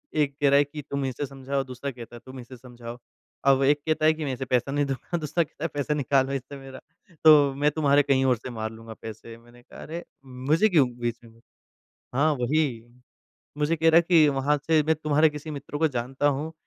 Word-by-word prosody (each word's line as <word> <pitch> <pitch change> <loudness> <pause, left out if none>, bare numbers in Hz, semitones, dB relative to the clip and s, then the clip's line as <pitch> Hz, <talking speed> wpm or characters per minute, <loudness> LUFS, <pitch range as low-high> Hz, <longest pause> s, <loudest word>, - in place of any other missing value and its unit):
एक 145 -2 +1
कह 145 - +4
रहा 140 - +5
है 145 - +5
कि 145 +1 -8
तुम 140 -1 -2
इसे 130 +2 -3
समझाओ 135 0 -3
दूसरा 130 +2 -6
कहता 120 -1 -11
है - - -10
तुम 130 0 -10
इसे 125 +1 -11
समझाओ। 120 -1 -10 0.5
अब 135 0 +4
एक 145 +2 +4
कहता 155 -1 0
है 155 - +5
कि 155 -1 -5
मैं 135 - -2
इसे 130 +1 -5
पैसा 125 +2 0
नहीं 145 +1 +1
दूँगा 140 +6 -4
दूसरा 165 +2 0
कहता 150 - -12
है 165 - +1
पैसा 145 +1 -1
निकालो 135 -1 +1
इससे 140 +1 -6
मेरा 135 -1 -11 0.4
तो 145 -3 +7
मैं 145 +2 +2
तुम्हारे 145 -1 +3
कहीं 135 -1 +2
और 125 -3 +3
से 125 - -9
मार 110 -2 -5
लूँगा 115 0 -11
पैसे। 115 +1 -9
मैंने 120 +1 -19
कहा - - -14
अरे! 170 +3 -7 0.2
मुझे 135 +10 +1
क्यों 150 -9 +4
बीच 120 -1 -2
में 115 0 -18 0.8
हाँ, 150 +4 +3
वही। 130 -2 -1 0.7
मुझे 150 +3 +1
कह 160 +1 +2
रहा 160 - +4
है 170 - +7
कि 165 -4 +6
वहाँ 140 +1 +1
से 160 -1 +4
मैं 160 +2 +2
तुम्हारे 155 0 +3
किसी 150 +1 -8
मित्र 145 0 -6
को 160 +1 +3
जानता 130 +2 -2
हूँ 145 +3 -2
140 Hz, 225 wpm, -25 LUFS, 125-150 Hz, 0.8 s, तो